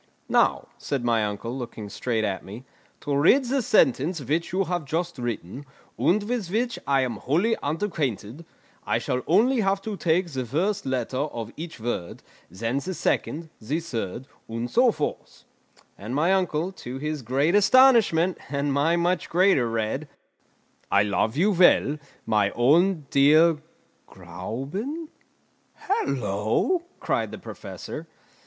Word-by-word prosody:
"Now," -, -, +2 dB
said 135 Hz, -4 st, -3 dB
my 115 Hz, -2 st, +2 dB
uncle, 105 Hz, +4 st, -4 dB
looking 115 Hz, -5 st, -6 dB
straight 110 Hz, +2 st, -2 dB
at 100 Hz, -3 st, -2 dB
me, 105 Hz, +6 st, -9 dB, 0.4 s
"to 145 Hz, -, -1 dB
read 210 Hz, -, +4 dB
the 265 Hz, +2 st, 0 dB
sentence 165 Hz, -, +2 dB
which 150 Hz, +5 st, -2 dB
you 190 Hz, +2 st, +1 dB
have 175 Hz, -1 st, -2 dB
just 165 Hz, +1 st, -3 dB
written, 120 Hz, +1 st, -4 dB, 0.3 s
and 200 Hz, +4 st, +2 dB
with 220 Hz, -4 st, -3 dB
which 235 Hz, +5 st, -1 dB
I 135 Hz, -1 st, +3 dB
am 125 Hz, -4 st, -2 dB
wholly 175 Hz, -, +1 dB
unacquainted, 145 Hz, -, -3 dB, 0.4 s
I -, -, 0 dB
shall 125 Hz, -, -2 dB
only 250 Hz, +3 st, +4 dB
have 195 Hz, -2 st, +1 dB
to 215 Hz, -2 st, -4 dB
take 175 Hz, 0 st, +1 dB
the 130 Hz, -2 st, -2 dB
first 175 Hz, -, -1 dB
letter 130 Hz, -1 st, -2 dB
of 120 Hz, -6 st, -4 dB
each 160 Hz, -4 st, -8 dB
word, 110 Hz, -7 st, -4 dB, 0.3 s
then 115 Hz, +9 st, -2 dB
the 185 Hz, +6 st, -5 dB
second, 160 Hz, 0 st, -1 dB
the 140 Hz, +9 st, -2 dB
third, 120 Hz, -, -5 dB, 0.2 s
and 115 Hz, +2 st, -4 dB
so 245 Hz, 0 st, +5 dB
forth." 150 Hz, -, -5 dB, 0.6 s
And 110 Hz, +6 st, -5 dB
my 165 Hz, +6 st, +3 dB
uncle, 180 Hz, -2 st, 0 dB
to 130 Hz, -9 st, -8 dB
his 150 Hz, +1 st, -3 dB
great 135 Hz, +8 st, +1 dB
astonishment, 205 Hz, -6 st, +5 dB
and 140 Hz, 0 st, -1 dB
my 150 Hz, +4 st, +2 dB
much 175 Hz, +1 st, 0 dB
greater, 175 Hz, -9 st, +3 dB
read: 115 Hz, +6 st, -2 dB, 0.8 s
"I 100 Hz, 0 st, +5 dB
love 110 Hz, +4 st, 0 dB
you 200 Hz, +6 st, +3 dB
well, 170 Hz, -5 st, +4 dB, 0.3 s
my 105 Hz, -2 st, +2 dB
own 160 Hz, +6 st, +3 dB
dear 155 Hz, +4 st, +5 dB, 0.5 s
Gräuben!" 210 Hz, -, -6 dB, 0.7 s
"Hallo!" 130 Hz, -, 0 dB, 0.2 s
cried -, -, -1 dB
the -, -, -7 dB
Professor. -, -, -8 dB
150 Hz, 145 wpm, -25 LUFS, 120-185 Hz, 0.8 s, so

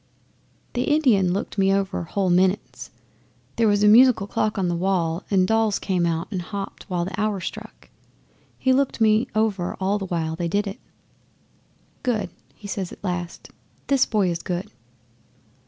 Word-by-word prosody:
'The 245 Hz, +1 st, -1 dB
Indian 245 Hz, -, +3 dB
looked 200 Hz, +2 st, -3 dB
me 195 Hz, 0 st, +4 dB
over 195 Hz, -1 st, 0 dB
whole 190 Hz, +1 st, 0 dB
minutes 185 Hz, +2 st, 0 dB, 0.7 s
there 230 Hz, -, +3 dB
was 205 Hz, 0 st, +2 dB
a -, -, +6 dB
musical 235 Hz, -1 st, +6 dB
clock 210 Hz, +1 st, -1 dB
on 190 Hz, -2 st, 0 dB
the 175 Hz, -, 0 dB
wall 175 Hz, -1 st, 0 dB
and 190 Hz, -2 st, +3 dB
dolls 225 Hz, -1 st, +2 dB
came 180 Hz, -3 st, 0 dB
out 165 Hz, 0 st, -2 dB
and 185 Hz, -3 st, -2 dB
hopped 200 Hz, +3 st, -7 dB
while 175 Hz, -2 st, -1 dB
the 190 Hz, +3 st, -4 dB
hour 210 Hz, -2 st, 0 dB
struck. 175 Hz, -, -8 dB, 0.7 s
He 260 Hz, -, +2 dB
looked 270 Hz, -1 st, +1 dB
me 220 Hz, +2 st, +3 dB
over 210 Hz, -5 st, 0 dB
all 195 Hz, +2 st, 0 dB
the 195 Hz, -, -5 dB
while 160 Hz, -2 st, -2 dB
they 170 Hz, +1 st, -2 dB
did 205 Hz, +5 st, 0 dB
it. 195 Hz, 0 st, -6 dB, 1.2 s
'"Good," 235 Hz, -4 st, -1 dB, 0.2 s
he 205 Hz, -, -10 dB
says 195 Hz, -3 st, -4 dB
at -, -, -13 dB
last. 175 Hz, -2 st, -5 dB, 0.3 s
"This 275 Hz, -2 st, +3 dB
boy 200 Hz, -5 st, +1 dB
is 170 Hz, -1 st, -4 dB
good." 180 Hz, +1 st, -4 dB
195 Hz, 170 wpm, -23 LUFS, 180-215 Hz, 1.2 s, a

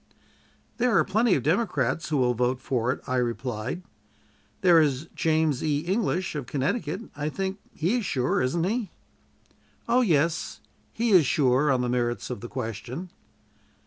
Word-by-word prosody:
"There 245 Hz, -1 st, +3 dB
are -, -, +5 dB
plenty 215 Hz, +1 st, +2 dB
of 135 Hz, -, -1 dB
Democrats 160 Hz, -, 0 dB
who 150 Hz, -, +1 dB
will 125 Hz, -2 st, +3 dB
vote 125 Hz, +2 st, 0 dB
for 125 Hz, -2 st, 0 dB
it," -, -, -5 dB
I 130 Hz, -2 st, -1 dB
replied. 125 Hz, +5 st, -2 dB, 0.8 s
"There 175 Hz, -4 st, +6 dB
is 145 Hz, 0 st, 0 dB
James 155 Hz, -4 st, +1 dB
E. 150 Hz, -2 st, +1 dB
English, 185 Hz, +1 st, -1 dB
of 145 Hz, -5 st, -5 dB
Connecticut; 145 Hz, -, -2 dB
I 150 Hz, +1 st, -2 dB
think 195 Hz, +4 st, -3 dB, 0.2 s
he 180 Hz, +10 st, +1 dB
is -, -, -4 dB
sure, 130 Hz, -6 st, 0 dB
isn't 145 Hz, +7 st, 0 dB
he?" 215 Hz, +2 st, -1 dB, 1.0 s
"Oh, 240 Hz, +2 st, +4 dB
yes; 165 Hz, -, +1 dB, 0.3 s
he 230 Hz, 0 st, 0 dB
is 175 Hz, -8 st, +6 dB
sure 135 Hz, +1 st, +3 dB
on 130 Hz, -2 st, +2 dB
the 125 Hz, -, -1 dB
merits 120 Hz, 0 st, -1 dB
of 125 Hz, -, -5 dB
the 120 Hz, -, -7 dB
question." 125 Hz, -, -5 dB
150 Hz, 160 wpm, -26 LUFS, 125-185 Hz, 1.0 s, There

